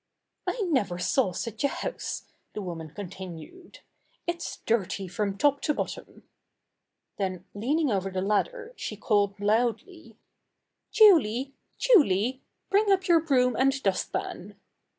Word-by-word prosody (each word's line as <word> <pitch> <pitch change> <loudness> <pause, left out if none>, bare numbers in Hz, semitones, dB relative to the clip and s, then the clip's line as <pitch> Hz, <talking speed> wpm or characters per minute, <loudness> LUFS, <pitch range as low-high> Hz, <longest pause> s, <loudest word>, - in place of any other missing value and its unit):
"I - - -1
never 260 - 0
saw 190 +3 +1
such 220 +6 -5
a - - +5
house!" - - -4 0.3
the 210 - -4
woman 165 -3 -6
con 200 +5 -7
tinued. 190 - -10 0.4
"It's 345 0 -4
dirty 200 -3 0
from 200 +2 -2
top 285 +5 +2
to 300 - 0
bottom." - - -6 0.9
Then 185 -2 -3
leaning 275 +7 0
over 195 -1 0
the 185 0 -2
ladder, 465 - -1
she - - -5
called 205 -2 +1
loudly: 230 - -1 0.7
"Julie! 280 - +5 0.2
Julie, 260 - +3 0.3
bring 405 +1 +4
up 380 -1 +2
your 340 -2 +6
broom 250 -6 +2
and 270 +2 +2
dust 195 -2 0
pan." - - -5
235 Hz, 130 wpm, -27 LUFS, 195-330 Hz, 0.9 s, your